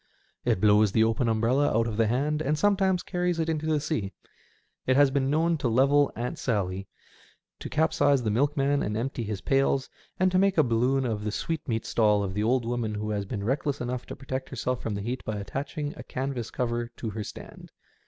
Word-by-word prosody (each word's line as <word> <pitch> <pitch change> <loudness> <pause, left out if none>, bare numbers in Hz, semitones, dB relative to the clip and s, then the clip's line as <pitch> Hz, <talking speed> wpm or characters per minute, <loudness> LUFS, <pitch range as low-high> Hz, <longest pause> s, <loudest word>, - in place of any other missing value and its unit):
It - - +2
blows 105 0 +5
the 110 - +4
open 115 +2 +1
umbrella 120 +6 +2
out 115 - +2
of 115 -2 -3
the 115 0 +2
hand, 145 +6 0
and 150 0 0
sometimes 190 0 +2
carries 180 -2 -1
it 160 - 0
into 155 -1 -1
the 155 -1 +2
sea. 145 -10 -2 0.7
It 130 - +4
has 140 -1 +5
been 135 -1 +1
known 165 +2 +2
to 130 - 0
level 140 +5 +4
Aunt 120 +2 -4
Sally, 95 -5 -1 0.7
to - - -6
capsize 145 -4 +2
the 110 - 0
milkman 140 +3 +1
and 105 +1 -2
empty 120 +1 -2
his 105 -3 -4
pails, 135 +2 +1 0.3
and 185 0 +3
to 185 - +3
make 195 -1 +2
a 155 - +6
balloon 125 +3 +1
of 110 -3 -2
the 105 - -2
sweetmeat 120 -4 -2
stall 105 -2 +3
of 95 -1 -3
the 105 - -1
old 120 +2 +2
woman 115 -3 -2
who 105 +1 -3
has 100 -1 -2
been 100 -2 -4
reckless 135 +5 -1
enough 125 0 -4
to - - -6
protect 130 -1 -5
herself 125 -1 -2
from 110 - -3
the 100 - -3
heat 120 +5 -4
by 110 -1 -3
attaching 140 +8 -4
a - - -8
canvas 130 -3 -4
cover 120 -1 -2
to 110 - -4
her 105 +1 -4
stand. - - -10
125 Hz, 210 wpm, -27 LUFS, 110-145 Hz, 0.7 s, a